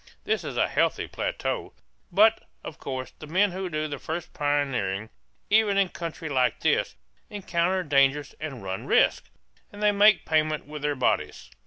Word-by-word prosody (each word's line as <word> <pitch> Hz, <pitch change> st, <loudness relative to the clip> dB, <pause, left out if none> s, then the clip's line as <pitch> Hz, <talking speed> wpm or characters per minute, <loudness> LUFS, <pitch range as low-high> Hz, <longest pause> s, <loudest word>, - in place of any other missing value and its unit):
This -, -, -1 dB
is -, -, -5 dB
a -, -, +3 dB
healthy -, -, 0 dB
plateau. -, -, -3 dB, 0.4 s
But, 215 Hz, +5 st, +4 dB, 0.2 s
of 155 Hz, -, -8 dB
course, 130 Hz, -1 st, -5 dB
the 155 Hz, -, -9 dB
men 190 Hz, +5 st, +2 dB
who 185 Hz, +1 st, -4 dB
do 155 Hz, -1 st, -2 dB
the 145 Hz, -2 st, -6 dB
first 170 Hz, +2 st, -5 dB
pioneering, 125 Hz, -9 st, -1 dB, 0.4 s
even 210 Hz, -2 st, +4 dB
in 195 Hz, -2 st, +3 dB
country 165 Hz, -2 st, -6 dB
like 130 Hz, -4 st, +1 dB
this, -, -, +1 dB, 0.3 s
encounter 185 Hz, -2 st, -1 dB
dangers 140 Hz, 0 st, +2 dB
and 140 Hz, -8 st, -6 dB
run 95 Hz, 0 st, -5 dB
risks; -, -, +3 dB, 0.4 s
and 205 Hz, +1 st, -8 dB
they 210 Hz, -, +5 dB
make 205 Hz, -1 st, +5 dB
payment 155 Hz, -1 st, +1 dB
with 150 Hz, 0 st, -8 dB
their 145 Hz, 0 st, 0 dB
bodies. 120 Hz, -, -1 dB
155 Hz, 165 wpm, -26 LUFS, 140-190 Hz, 0.4 s, they